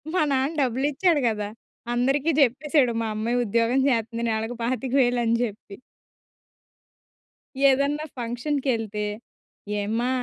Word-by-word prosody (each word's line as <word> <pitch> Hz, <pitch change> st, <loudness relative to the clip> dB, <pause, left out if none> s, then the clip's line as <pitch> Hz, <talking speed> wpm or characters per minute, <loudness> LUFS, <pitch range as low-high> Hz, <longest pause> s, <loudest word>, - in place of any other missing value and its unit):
మా 365 Hz, -, +3 dB
నాన్న 270 Hz, +2 st, +1 dB
డబ్బులిచ్చాడు 285 Hz, +6 st, +1 dB
కదా! 210 Hz, -2 st, -3 dB, 0.4 s
అందరికి 270 Hz, +6 st, +1 dB
చెప్పేసాడు, 275 Hz, 0 st, +3 dB
"మా 225 Hz, -, -1 dB
అమ్మాయి 230 Hz, +3 st, -1 dB
ఉద్యోగం 230 Hz, +4 st, +2 dB
చేస్తుంది 230 Hz, -1 st, -1 dB
నెలకు 220 Hz, +2 st, -2 dB
పాతిక 255 Hz, +1 st, -2 dB
వేలని" 240 Hz, -2 st, +2 dB
చెప్పి. 205 Hz, -3 st, -6 dB, 1.9 s
ఏదన్నా 280 Hz, +3 st, +1 dB
ఫంక్షన్‌కెళ్తే, 240 Hz, -3 st, -2 dB, 0.8 s
"ఏమ్మా! 225 Hz, +4 st, -1 dB
245 Hz, 100 wpm, -24 LUFS, 230-275 Hz, 1.9 s, మా